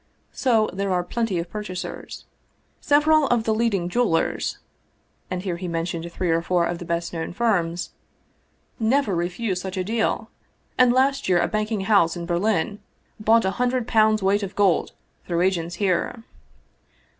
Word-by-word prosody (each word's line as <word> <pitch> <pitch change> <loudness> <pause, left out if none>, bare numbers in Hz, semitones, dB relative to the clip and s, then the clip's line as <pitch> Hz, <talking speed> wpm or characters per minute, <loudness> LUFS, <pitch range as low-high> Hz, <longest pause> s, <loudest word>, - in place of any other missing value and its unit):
So 225 -5 +2
there 195 +1 -2
are 180 -1 +1
plenty 225 0 -2
of 170 +1 -3
purchasers. 210 -4 -6 0.5
Several 300 0 +4
of 240 -2 +2
the 220 - +1
leading 215 -6 0
jewelers 195 -4 0 0.3
" - - -43
(and 185 0 -3
here 180 -3 -2
he 180 +1 -5
named 170 0 -3
three 175 0 -1
or 165 0 +2
four 175 0 +1
of 170 0 -3
the 175 - -7
best 170 0 -2
known 165 0 -4
firms) 175 -6 0 0.5
" - - -41 0.2
never 275 -10 +1
refuse 180 +3 -2
such 190 0 -5
a 185 - 0
deal, 220 +4 -1 0.4
and 250 -1 +5
last 265 -1 +2
year 180 -1 +4
a 170 - +2
banking 215 -1 -1
house 190 -4 +3
in 170 - -5
Berlin 195 +3 0 0.4
bought 220 0 +4
a 190 - +1
hundred 250 -1 0
pounds' 215 -3 +3
weight 200 +2 +2
of 195 -2 -5
gold 195 -5 +2 0.3
through 170 -1 0
agents 175 -2 0
here. 200 +4 -1
190 Hz, 165 wpm, -23 LUFS, 175-225 Hz, 0.5 s, and